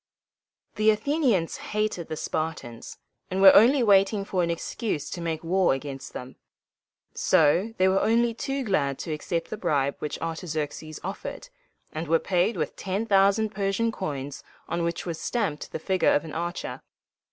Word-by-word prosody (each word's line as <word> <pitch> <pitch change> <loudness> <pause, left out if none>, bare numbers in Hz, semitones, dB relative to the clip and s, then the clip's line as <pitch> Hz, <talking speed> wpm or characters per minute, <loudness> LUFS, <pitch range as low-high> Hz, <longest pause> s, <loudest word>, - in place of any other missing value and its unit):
The 215 0 +4
Athenians 220 - +1
hated 210 -5 -2
the 155 - -4
Spartans, 150 -9 -4 0.3
and 185 0 -2
were 190 0 +9
only 250 +5 +6
waiting 200 -1 +4
for 185 -2 0
an 170 - 0
excuse 170 0 -3
to 175 - -5
make 165 -1 -3
war 180 -2 +2
against 135 -1 -7
them: 125 +1 -8 0.8
so 175 +9 +3
they 185 - +4
were 190 +1 +3
only 230 +2 +2
too 270 +3 -3
glad 145 - 0
to 160 - -4
accept 165 +2 -3
the 215 - -3
bribe 140 -7 0
which 150 - -4
Artaxerxes 155 -2 -4
offered, 195 - -6 0.4
and 160 +2 -4
were 165 +2 +4
paid 185 +6 0
with - - -2
ten 195 +3 -2
thousand 200 +1 +3
Persian 200 +3 0
coins 145 -9 -5 0.2
on 170 - -2
which 170 0 -2
was 170 -3 -4
stamped 205 -11 -2
the - - -3
figure 185 +3 +2
of 145 - 0
an 155 - -8
archer. 175 +2 -4
185 Hz, 165 wpm, -26 LUFS, 155-210 Hz, 0.8 s, were